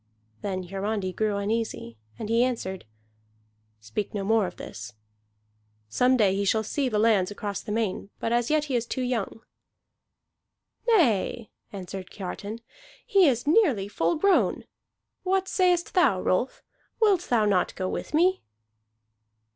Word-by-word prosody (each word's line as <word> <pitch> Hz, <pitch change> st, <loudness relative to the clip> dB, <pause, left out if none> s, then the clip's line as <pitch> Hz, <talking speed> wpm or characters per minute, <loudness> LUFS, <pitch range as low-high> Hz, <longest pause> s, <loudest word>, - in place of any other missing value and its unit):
Then 185 Hz, -2 st, -3 dB
Hiarandi 195 Hz, +1 st, -3 dB
grew 215 Hz, 0 st, 0 dB
uneasy, 205 Hz, -, -2 dB, 0.2 s
and 210 Hz, -, -5 dB
he 230 Hz, +2 st, +3 dB
answered: 190 Hz, -, -3 dB, 0.9 s
"Speak 110 Hz, -, -5 dB
no 200 Hz, -, -2 dB
more 220 Hz, -1 st, +2 dB
of 175 Hz, -, -9 dB
this. 110 Hz, +3 st, -8 dB, 1.0 s
Some 250 Hz, -, +3 dB
day 200 Hz, -5 st, +3 dB
he 200 Hz, -, 0 dB
shall 220 Hz, +2 st, +2 dB
see 265 Hz, +5 st, -1 dB
the 215 Hz, -, -1 dB
lands 210 Hz, -4 st, +3 dB
across 205 Hz, -1 st, -4 dB
the -, -, -7 dB
main, 210 Hz, -3 st, -2 dB
but 230 Hz, -, -2 dB
as 240 Hz, 0 st, +1 dB
yet 305 Hz, -1 st, +2 dB
he 280 Hz, -4 st, -2 dB
is 235 Hz, -1 st, 0 dB
too 260 Hz, -, -2 dB
young." 230 Hz, -3 st, -2 dB, 1.5 s
"Nay," 240 Hz, -, +2 dB, 0.2 s
answered 190 Hz, -1 st, -7 dB
Kiartan, 205 Hz, +3 st, -6 dB, 0.4 s
"he 390 Hz, -4 st, +5 dB
is 245 Hz, -3 st, +1 dB
nearly 295 Hz, -, +3 dB
full 170 Hz, -4 st, 0 dB
grown. 400 Hz, +4 st, +2 dB, 0.6 s
What 380 Hz, 0 st, 0 dB
sayest 360 Hz, -3 st, +1 dB
thou, 260 Hz, -, +4 dB
Rolf? 185 Hz, +8 st, -1 dB, 0.4 s
Wilt 400 Hz, -6 st, +3 dB
thou 230 Hz, -3 st, +3 dB
not 195 Hz, -3 st, +1 dB
go 185 Hz, -, -2 dB
with 300 Hz, -, -4 dB
me?" 370 Hz, +4 st, +3 dB
220 Hz, 145 wpm, -26 LUFS, 195-260 Hz, 1.5 s, he